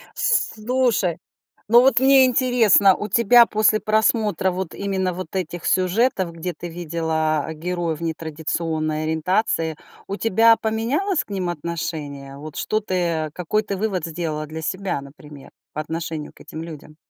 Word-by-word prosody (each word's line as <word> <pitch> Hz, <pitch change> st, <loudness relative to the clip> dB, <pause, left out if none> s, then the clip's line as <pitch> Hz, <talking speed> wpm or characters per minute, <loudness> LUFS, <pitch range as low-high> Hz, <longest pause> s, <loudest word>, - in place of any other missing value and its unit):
Слушай, 230 Hz, -, +1 dB, 0.5 s
ну, 235 Hz, +2 st, +7 dB
вот 260 Hz, -2 st, +4 dB
мне 265 Hz, 0 st, +6 dB
интересно, 240 Hz, -6 st, +4 dB
у 210 Hz, -, -5 dB
тебя 235 Hz, +3 st, +6 dB
после 215 Hz, 0 st, +3 dB
просмотра 215 Hz, -3 st, +1 dB
вот 185 Hz, -2 st, -4 dB
именно 190 Hz, -2 st, -1 dB
вот 185 Hz, +1 st, -6 dB
этих 175 Hz, -2 st, -4 dB
сюжетов, 185 Hz, -1 st, +1 dB
где 170 Hz, +2 st, -4 dB
ты 175 Hz, +2 st, -8 dB
видела 160 Hz, -2 st, -1 dB
героев 170 Hz, -1 st, -3 dB
нетрадиционной 160 Hz, -1 st, -2 dB
ориентации, 160 Hz, 0 st, 0 dB, 0.3 s
у 200 Hz, -, -3 dB
тебя 225 Hz, +1 st, +4 dB
поменялось 265 Hz, -, 0 dB
к -, -, -28 dB
ним 185 Hz, -3 st, -2 dB
отношение? 150 Hz, -4 st, -5 dB
Вот 150 Hz, +1 st, -9 dB
что 215 Hz, 0 st, 0 dB
ты, 190 Hz, -3 st, -4 dB
э, 165 Hz, -4 st, 0 dB
какой 200 Hz, +5 st, -1 dB
ты 200 Hz, -1 st, -4 dB
вывод 190 Hz, -4 st, -2 dB
сделала 155 Hz, -2 st, -3 dB
для 160 Hz, +1 st, -7 dB
себя, 185 Hz, -2 st, -2 dB
например, 140 Hz, 0 st, -13 dB, 0.2 s
по 155 Hz, -, -4 dB
отношению 160 Hz, -1 st, -5 dB
к -, -, -22 dB
этим 160 Hz, -, -8 dB
людям? 155 Hz, -2 st, -10 dB
180 Hz, 145 wpm, -22 LUFS, 160-215 Hz, 0.5 s, ну